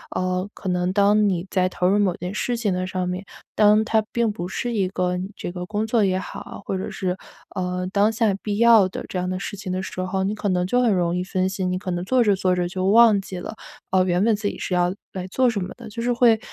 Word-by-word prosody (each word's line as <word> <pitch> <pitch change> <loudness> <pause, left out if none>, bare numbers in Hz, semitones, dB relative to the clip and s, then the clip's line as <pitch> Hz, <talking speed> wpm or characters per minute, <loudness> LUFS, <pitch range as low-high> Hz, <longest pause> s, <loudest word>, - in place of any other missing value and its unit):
呃， 185 +1 -1
可 190 - -8
能 180 0 0
当 205 +1 +4
你 180 -1 -1
在 185 -1 +2
投 180 0 0
入 205 +2 +3
某 190 -4 +2
件 180 +3 -5
事 240 +2 -1
情 210 -5 0
的 185 0 -2
上 185 -1 -2
面， 180 +2 -3 0.3
当 210 +1 +5
它 220 -1 +2
并 235 -2 +1
不 175 -3 -5
是 240 +5 -3
一 195 -4 +1
个 180 -1 -1
你 185 +2 -4
这 - - -5
个 180 0 -5
工 215 +1 -1
作 220 -1 +2
也 185 -1 +2
好， 190 - -7
或 - - -2
者 185 - -4
是， 180 -1 -2 0.4
呃， 180 0 -2
当 205 +2 +4
下 220 -3 +1
必 205 -1 -2
要 225 -5 +6
的 - - -6
这 185 - -3
样 180 0 -2
的 185 0 -2
事 205 - -5
情 190 -2 -6
的 185 +1 -2
时 185 - -5
候， 190 +1 -1
你 200 +2 0
可 205 -1 -2
能 180 -1 +1
就 245 +6 +2
很 230 -4 +3
容 175 -1 +1
易 180 - -1
分 185 0 0
心， 185 -1 -2
你 185 - -1
可 185 -1 -4
能 175 0 -2
做 255 +2 +3
着 205 -2 +3
做 185 -1 +1
着 175 -1 0
就 185 +1 -3
忘 220 0 +6
记 190 -1 -7
了， 220 - -6 0.4
呃， 185 -1 +4
原 180 +1 +1
本 225 -1 +3
自 205 0 -3
己 - - -4
是 185 - -4
要 180 +1 +2 0.2
来 185 -1 -4
做 255 +6 +2
什 215 -3 -1
么 180 - -5
的， 235 -2 -10
就 230 +3 -6
是 245 +1 0
会， 235 -2 +4
190 Hz, 295 characters per minute, -23 LUFS, 180-215 Hz, 0.4 s, 要